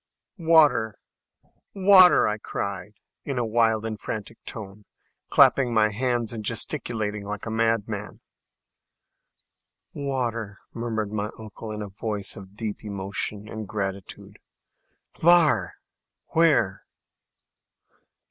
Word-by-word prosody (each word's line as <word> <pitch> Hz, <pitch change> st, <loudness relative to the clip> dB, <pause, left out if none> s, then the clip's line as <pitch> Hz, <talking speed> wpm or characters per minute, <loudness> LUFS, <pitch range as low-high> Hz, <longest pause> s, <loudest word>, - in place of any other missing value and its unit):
"Water, 155 Hz, -10 st, +4 dB, 0.8 s
water!" 190 Hz, -2 st, +7 dB
I 105 Hz, 0 st, -2 dB
cried, 100 Hz, -1 st, -5 dB, 0.3 s
in 140 Hz, -3 st, -4 dB
a 120 Hz, -, 0 dB
wild 110 Hz, -1 st, +2 dB
and 110 Hz, -1 st, -4 dB
frantic 110 Hz, +1 st, -6 dB
tone, 105 Hz, -2 st, -8 dB, 0.5 s
clapping 130 Hz, -3 st, +5 dB
my 105 Hz, -1 st, +4 dB
hands, 120 Hz, 0 st, -1 dB
and 110 Hz, -2 st, -6 dB
gesticulating 110 Hz, -3 st, -2 dB
like 105 Hz, 0 st, -5 dB
a 110 Hz, -, -4 dB
madman. 110 Hz, -2 st, -1 dB, 1.7 s
"Water!" 120 Hz, -7 st, -3 dB, 0.2 s
murmured 110 Hz, -3 st, -3 dB
my 105 Hz, 0 st, -2 dB
uncle, 110 Hz, 0 st, -9 dB
in 105 Hz, 0 st, -5 dB
a -, -, -6 dB
voice 100 Hz, 0 st, -2 dB
of 95 Hz, +1 st, -12 dB
deep 110 Hz, -2 st, -5 dB
emotion 100 Hz, +1 st, -4 dB
and 110 Hz, -1 st, -7 dB
gratitude. 100 Hz, -2 st, -6 dB, 0.8 s
"Hvar?" 155 Hz, -, +4 dB, 0.6 s
("Where?") 150 Hz, -12 st, +2 dB
110 Hz, 105 wpm, -25 LUFS, 105-120 Hz, 1.7 s, water